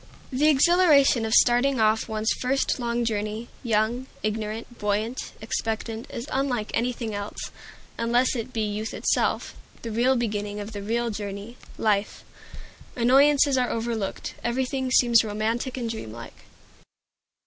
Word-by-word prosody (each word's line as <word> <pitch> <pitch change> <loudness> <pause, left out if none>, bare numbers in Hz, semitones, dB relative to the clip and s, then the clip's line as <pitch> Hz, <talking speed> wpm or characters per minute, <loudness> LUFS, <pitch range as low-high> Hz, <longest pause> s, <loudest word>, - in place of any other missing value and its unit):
The 285 +4 +3
exhilaration 295 -5 +5
of 220 - -1
starting 245 +2 +4
off 220 +1 +2
on - - -4
one's 215 +1 +1
first 265 +1 0
long 235 0 -1
journey, 215 +1 -3
young, 230 +2 0 0.2
ignorant, 215 +2 -4
buoyant, 210 +4 -2
expectant, 225 +1 -3
is 235 +4 -6
unlike 255 -5 -1
anything 235 -2 -1
else, 205 0 -5 0.5
unless 240 +3 +2
it 240 +1 -4
be 225 - -2
youth 210 +1 -3
itself, - - 0 0.3
the 230 - -4
real 245 +4 +3
beginning 210 -3 -2
of 205 +1 -6
the 205 -2 -6
real 230 +3 -1
journey 205 +2 -6 0.2
life. 210 -1 0 0.7
Annoyances 270 +2 +4
are 250 - +1
overlooked. 225 -3 -3
Everything 260 +2 -1
seems 240 -3 +5
romantic 225 +5 -2
and 240 -2 -2
dreamlike. 115 - -8
230 Hz, 135 wpm, -25 LUFS, 215-250 Hz, 0.7 s, exhilaration